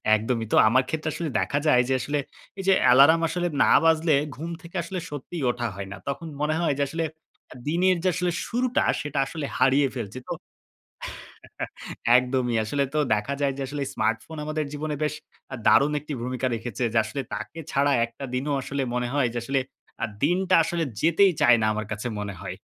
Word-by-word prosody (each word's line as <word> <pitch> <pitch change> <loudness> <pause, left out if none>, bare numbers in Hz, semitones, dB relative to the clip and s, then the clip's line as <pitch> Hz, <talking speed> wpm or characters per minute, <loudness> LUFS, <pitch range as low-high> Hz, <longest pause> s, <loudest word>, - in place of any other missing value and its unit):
একদমই 115 +1 -1
তো। - - +3
আমার 130 +3 +4
ক্ষেত্রে 155 0 -2
আসলে 165 -3 -3
দেখা 140 - 0
যায় 125 -4 +6
যে - - +3
আসলে 145 +3 -1 0.4
এই 195 - -3
যে 195 - +7
অ্যালার্ম 140 +7 +7
আসলে 175 +1 -1 0.2
না - - +4
বাজলে 160 -2 +4 0.2
ঘুম 165 +5 -6
থেকে 170 +1 -13
আসলে 185 0 -4
সত্যিই 150 +2 -6
ওঠা 120 -1 -3
হয় 100 0 -6
না। 100 - -6
তখন 140 +4 -3
মনে 155 +1 +1
হয় 165 -4 +2
যে - - +3
আসলে 165 +2 -2 0.6
দিনের 180 +3 +3
যে 185 - +3
আসলে 180 -1 0 0.2
শুরুটা 245 +1 +1 0.2
সেটা 145 -1 -3
আসলে 150 +2 -5
হারিয়ে 135 +2 +4
ফেলছি 120 0 -5
তো - - -2 1.8
একদমই। 125 -1 +1
আসলে 140 +6 0
তো - - +2 0.2
দেখা 105 +7 -2
যায় 140 -1 +2
যে - - -2
আসলে 145 +1 -4
স্মার্টফোন 115 +8 -1
আমাদের 155 0 -2
জীবনে 150 0 -3
বেশ 150 - -1 0.5
দারুণ 145 +2 +5
একটি 150 +1 -7
ভূমিকা 130 +1 -2
রেখেছে। 115 +1 -5
যে - - +5
আসলে 130 +6 -4
তাকে 165 - -7
ছাড়া 140 +1 +3
একটা 115 +4 -10
দিনও 135 +3 -1
আসলে 140 +1 -3
মনে 125 0 -1
হয় 140 -4 +2
যে - - -1
আসলে 135 +2 +1 0.4
আ - - +1 0.2
দিনটা 185 +4 +2
আসলে 165 0 -1 0.2
যেতেই 175 +4 +4
চায় 120 0 +7
না - - +3
আমার 110 -1 -3
কাছে 110 +3 -3
মনে 100 -1 -4
হয়। - - -5
140 Hz, 190 wpm, -25 LUFS, 125-160 Hz, 1.8 s, যে